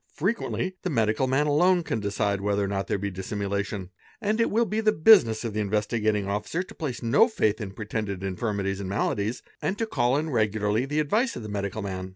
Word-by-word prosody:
Frequently 190 0 -1
the 185 - -2
medical 115 -2 +1
man 135 +3 +2
alone 175 +5 +3
can 115 - -2
decide 100 -1 -1
wheth 100 0 0
or 100 -1 +1
not 100 0 -2
there - - 0
be 100 +1 -3
dissimulation, 100 0 -3 0.3
and 220 +1 0
it 230 - +2
will 230 +2 +2
be 215 +1 -1
the 215 -1 +4
business 155 - +5
of 115 - -3
the 110 - -2
Inves: 105 0 0
gating 105 -2 +1
Officer 105 - -2
to 200 +4 -13
place 145 - -5
no 135 - +5
faith 110 - 0
in 105 - -4
pretended 100 -1 -4
infirmities 95 0 -2
and 95 -2 -4
maladi 105 +2 -1 0.2
and 195 - -1
to 225 - 0
call 130 - +1
in 155 +1 -2
regularly 110 +1 +1
the 150 +2 -1
advice 215 - +1
of 120 - -6
the 105 - -6
medical 100 +1 -3
man. 95 -1 -4
110 Hz, 215 wpm, -26 LUFS, 100-155 Hz, 0.3 s, business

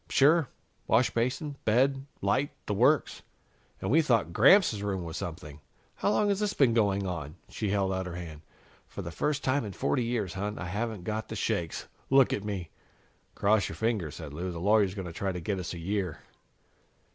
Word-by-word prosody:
"Sure. 150 +1 +4 0.4
Washbasin, 130 +5 +1
bed, 135 +5 +2 0.2
light 130 +9 +2 0.2
the 105 - -1
works. 125 +7 +2 0.6
And 95 - -2
we 160 +4 +6
thought 115 - +1
Gramps' 130 - +5
room 95 -3 -2
was 80 -1 -6
something. 80 -4 -6 0.3
How - - -1
long 205 0 +2
has 200 -1 +1
this 210 -1 -1
been 130 -5 +4
going 100 -3 +2
on?" 80 -5 -4
She 105 - -3
held 95 -1 +1
out 95 -1 -2
her 85 - -6
hand. 80 -4 -7 0.5
"For - - -7
the - - -6
first 150 -1 -1
time 130 +1 +1
in 105 -3 -6
forty 125 - 0
years, 115 -6 -2
hon, 105 +2 -3
I 95 - -5
haven't 105 +2 -3
got 110 +2 -3
the - - -6
shakes 85 -2 -2 0.2
look 135 -1 +5
at 100 - -2
me!" 95 -5 -4 0.6
"Cross 105 0 +2
your - - -6
fingers," 110 -9 -1
said 75 -3 -8
Lou. 90 +4 -4
"The 85 - -6
lawyer's 100 0 +3
going 95 -3 -5
to 85 - -7
try 95 +3 -2
to 90 - -4
get 95 +3 -2
us 90 - -4
a - - -7
year." 95 -1 -2
105 Hz, 195 wpm, -29 LUFS, 90-125 Hz, 0.6 s, we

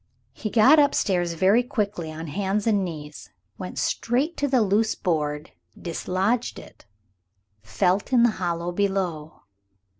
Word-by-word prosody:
He 215 - -5
got 255 +8 +6
up 285 -1 +3
stairs 175 -4 0
very 190 +8 +3
quickly, 210 - -3
on 160 +1 -7
hands 195 +6 -2
and 205 -4 +2
knees, 150 -4 -8 0.3
went - - -7
straight 270 +8 0
to 285 - 0
the 255 -4 +3
loose 215 +2 +1
board, 150 -3 -2 0.3
dislodged 190 +7 -1
it, - - -14 0.7
felt 180 - 0
in 245 -2 +5
the 240 - +4
hollow 170 0 -2
below. 175 -5 -2
195 Hz, 140 wpm, -24 LUFS, 170-225 Hz, 0.7 s, got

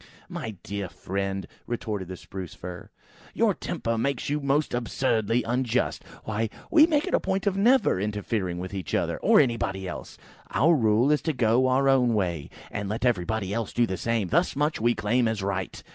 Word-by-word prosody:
"My 110 -3 -5
dear 100 -2 -4
friend," 95 +1 -3 0.2
retorted 105 -5 -3
the 95 0 -7
Spruce 95 -2 -8
fir, 90 -1 -8 0.5
"your - - +3
temper 115 0 -3
makes 140 +2 -1
you 150 - +1
most 140 +1 0
absurdly 120 -1 0
unjust. 125 +1 0 0.2
Why, 110 +1 -1 0.2
we 320 -2 +7
make 305 -2 +2
a - - +4
point 195 +1 -1
of 200 -2 +1
never 235 - +4
interfering 105 -3 -2
with 90 +2 -6
each 95 -2 -3
other, - - 0
or - - +3
with - - +8
anybody 95 -6 -2
else! 90 - -7 0.3
Our 155 +10 +4
rule 115 0 +3
is 150 - +2
to 160 - -1
go 125 0 +3
our 135 +2 +3
own 125 -4 +4
way, 85 -7 -1 0.2
and 100 -2 -3
let 110 +4 -2
everybody 105 -3 0
else 115 0 -3
do 120 - +3
the 95 - -3
same. 115 -3 -1
Thus 170 +2 +2
much 150 -2 0
we 120 +1 +3
claim 115 +3 +1
as 110 -3 -2
a - - -1
right." 95 -1 -3
115 Hz, 190 wpm, -26 LUFS, 100-130 Hz, 0.5 s, with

